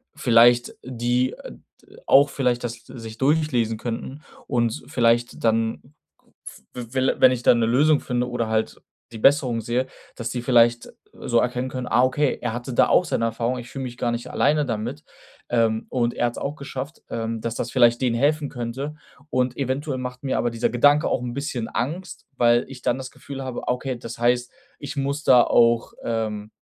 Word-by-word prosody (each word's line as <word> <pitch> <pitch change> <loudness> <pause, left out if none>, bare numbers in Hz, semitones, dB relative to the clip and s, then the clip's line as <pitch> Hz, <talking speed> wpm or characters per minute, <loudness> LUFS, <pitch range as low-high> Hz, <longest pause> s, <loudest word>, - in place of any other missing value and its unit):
vielleicht 120 +1 +4
die, 125 +1 0
äh, - - -10 0.3
d - - -19
auch 140 +1 +6
vielleicht 125 -3 -1
das 115 - -3
sich 115 -3 -9
durchlesen 135 -6 +1
könnten 120 +5 -5 0.3
und 120 -3 +1
s - - -7
vielleicht 120 0 +1
dann, 115 0 +1 0.6
v - - -10 0.3
wel 130 0 +1
wenn 130 - +8
ich 125 -1 -3
da - - +6
'ne 115 -1 +2
Lösung 145 +6 +3
finde 125 -1 -2
oder 120 -2 -2
halt 110 0 -1 0.3
die - - -6
Besserung 130 -3 +3
sehe, 125 +4 -1 0.3
dass 115 -1 -4
die 120 +1 -3
vielleicht, 120 -1 +3
äh, - - -13 0.4
so 120 -2 +3
erkennen 125 +1 -1
können: 125 -1 -5
„Ah, 125 +2 +3
okay, 135 +2 +1
er 120 -2 -2
hatte 120 +2 -5
da - - +4
auch - - +5
seine 115 - -1
Erfahrung, 115 +2 -1
ich 120 +1 -10
fühle 135 -1 -6
mich 120 -1 -7
gar 120 - -1
nicht 120 0 -5
alleine 150 +1 +2
damit. 120 +5 -4 0.5
Ähm, 115 -2 +1
und 120 -2 0
er 120 - 0
hat's 120 - -6
auch 140 +2 -4
geschafft“, 140 +1 -7
ähm, 115 -1 -3
dass 115 0 -3
das 120 - -4
vielleicht 120 -2 +4
denen 125 -3 +1
helfen 145 +3 +1
könnte. 130 +5 -5 0.3
Und 130 -2 0
eventuell 135 +1 -2
macht 125 +1 -6
mir 135 - -1
aber 120 - +1
dieser 115 0 0
Gedanke 145 +5 +4
auch - - 0
'n 120 -1 -4
bisschen 130 -4 -3
Angst, 170 +9 -4
weil 120 0 +4
ich 130 -2 -10
dann 120 - +1
das 130 -1 -7
Gefühl 135 -1 -8
habe: 130 -2 -6
„Ah, - - +3
okay, 125 0 -4
das 115 0 -8
heißt, 120 +1 +1 0.3
ich 145 +1 -7
muss 140 +2 -2
da 125 -2 +7
auch, 115 0 +3
ähm, 110 -2 -3
125 Hz, 200 wpm, -23 LUFS, 115-135 Hz, 0.6 s, wenn